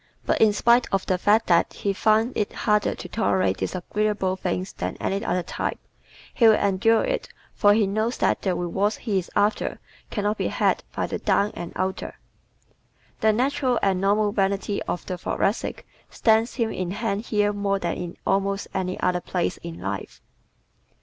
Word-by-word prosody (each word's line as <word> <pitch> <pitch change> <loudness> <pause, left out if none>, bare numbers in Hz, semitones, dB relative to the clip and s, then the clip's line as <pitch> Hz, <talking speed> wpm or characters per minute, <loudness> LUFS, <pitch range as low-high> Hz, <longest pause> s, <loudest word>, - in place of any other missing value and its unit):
But - - +1
in 220 -1 +6
spite 235 +4 +3
of 195 -1 0
the 185 -1 0
fact 215 +4 +3
that 170 -1 +3
he 200 - -2
finds 220 +4 +2
it 210 - -1
harder 210 -1 +1
to - - -8
tolerate 190 -4 +1
disagreeable 200 0 -1
things 185 0 -3
than - - -4
any 195 +2 -1
other 180 -5 0
type, - - -3 0.6
he 230 - +5
will 220 - +7
endure 200 +3 +2
it - - -2 0.2
for 205 0 +4
he 215 -1 +3
knows 215 +5 -1
that - - +1
the 185 -3 0
rewards 190 +5 0
he 205 -5 0
is 180 - -8
after 210 +1 +1 0.3
can 205 - -3
not 210 +1 0
be - - 0
had - - +1
by - - 0
the - - -4
down 200 +1 +2
and 170 - -6
outer. 190 +1 -3 1.0
The 220 - +4
natural 255 +2 +1
and 190 -2 +2
normal 205 +1 +2
vanity 200 0 0
of 175 - -3
the 180 -1 -4
Thoracic 200 +4 -1 0.2
stands 225 +1 +2
him 230 -3 0
in 185 -2 -3
hand 210 +2 -2
here 210 -1 +1
more 200 -1 0
than 175 -3 -2
in 175 -1 -6
almost 195 +1 0
any 185 -1 -2
other 180 -1 +1
place 175 0 -2
in 170 -1 -8
life. 100 0 -5
200 Hz, 180 wpm, -24 LUFS, 185-220 Hz, 1.0 s, will